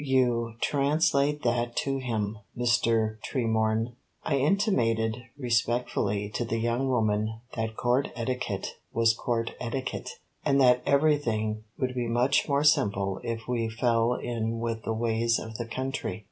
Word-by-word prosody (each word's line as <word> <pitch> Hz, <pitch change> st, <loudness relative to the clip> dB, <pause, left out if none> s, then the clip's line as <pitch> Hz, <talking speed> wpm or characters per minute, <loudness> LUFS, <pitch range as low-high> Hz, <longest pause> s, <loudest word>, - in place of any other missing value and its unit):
You 120 Hz, -4 st, +2 dB
translate 145 Hz, +1 st, +2 dB
that 120 Hz, 0 st, 0 dB
to 135 Hz, -1 st, 0 dB
him, 110 Hz, -4 st, -2 dB, 0.2 s
Mr. 115 Hz, -3 st, +2 dB
Tremorne." 110 Hz, -2 st, 0 dB, 0.3 s
I 140 Hz, -, +1 dB
intimated 125 Hz, -, +2 dB, 0.2 s
respectfully 120 Hz, -5 st, 0 dB
to -, -, -1 dB
the 115 Hz, 0 st, -2 dB
young 120 Hz, +4 st, 0 dB
woman 110 Hz, -2 st, 0 dB, 0.2 s
that 110 Hz, -1 st, -3 dB
Court 125 Hz, +3 st, +2 dB
etiquette 120 Hz, -4 st, -3 dB
was 115 Hz, -1 st, +3 dB
Court 115 Hz, 0 st, -1 dB
etiquette, 125 Hz, +2 st, -3 dB, 0.3 s
and 140 Hz, -2 st, +3 dB
that 125 Hz, -2 st, +5 dB
everything 115 Hz, -8 st, +1 dB
would 130 Hz, -1 st, -1 dB
be 120 Hz, -2 st, -2 dB
much 125 Hz, +6 st, +2 dB
more 140 Hz, +1 st, +2 dB
simple 100 Hz, -9 st, +2 dB
if 115 Hz, -1 st, -4 dB
we 115 Hz, -2 st, 0 dB
fell 115 Hz, +1 st, +2 dB
in 115 Hz, -1 st, -2 dB
with 115 Hz, -1 st, -2 dB
the 110 Hz, -, 0 dB
ways 115 Hz, 0 st, +1 dB
of 110 Hz, -1 st, -6 dB
the 120 Hz, -, -3 dB
country. 130 Hz, 0 st, -3 dB
120 Hz, 140 wpm, -28 LUFS, 110-130 Hz, 0.3 s, that